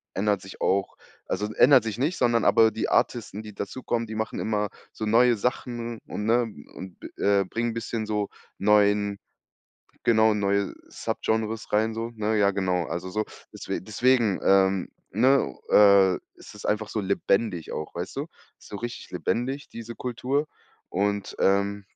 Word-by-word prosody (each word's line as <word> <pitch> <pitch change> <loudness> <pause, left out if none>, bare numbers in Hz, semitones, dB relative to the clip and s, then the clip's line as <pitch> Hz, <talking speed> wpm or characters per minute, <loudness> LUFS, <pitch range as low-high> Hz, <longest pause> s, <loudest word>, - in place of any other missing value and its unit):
ändert 100 -1 +1
sich 95 - -11
auch 95 +1 0 0.3
also, 105 +1 -2
ändert 130 -3 +6
sich 110 -1 -4
nicht, 155 +7 0
sondern 120 -2 +2
aber 110 -1 +6
die 110 - -2
Artisten, 110 -3 0
die 105 -1 -9
dazukommen, 115 +2 -3
die 110 - -7
machen 110 +1 -3
immer 105 -1 0 0.3
so 110 - -4
neue 120 +2 +5
Sachen 120 0 -3
und 105 - -4
ne 120 +2 +4 0.3
und 95 -1 -9
b - - -8
äh, 100 -1 +3
bringen 115 +3 -2
bisschen 115 -1 -3
so 105 -1 -1 0.3
neuen 105 0 +3 0.9
genau, 110 -2 +4
neue 100 -1 0
Subgenres 110 0 -2
rein 110 +1 +2
so, 115 +1 -4
ne? 110 0 0
Ja, 100 -1 +4
genau. 90 -3 0
Also, 85 +3 -4
so 110 +2 -1 0.3
deswe - - -4
deswegen, 115 0 +2
ähm, 95 -1 +3 0.2
ne, 125 - +3 0.2
äh, 100 -2 +7 0.2
ist - - -13
es 105 - -11
einfach 105 0 0
so 110 - -2
lebendig 100 -2 0
auch, 75 - -5
weißt 90 +7 -5
du? 140 - -1 0.4
Ist - - -16
so 100 - -6
richtig 120 +2 -6
lebendig, 135 +4 -2
diese 115 0 -8
Kultur 130 +4 -1 0.4
und, 100 +1 -1
ähm 100 +1 +2
105 Hz, 160 wpm, -26 LUFS, 100-115 Hz, 0.9 s, äh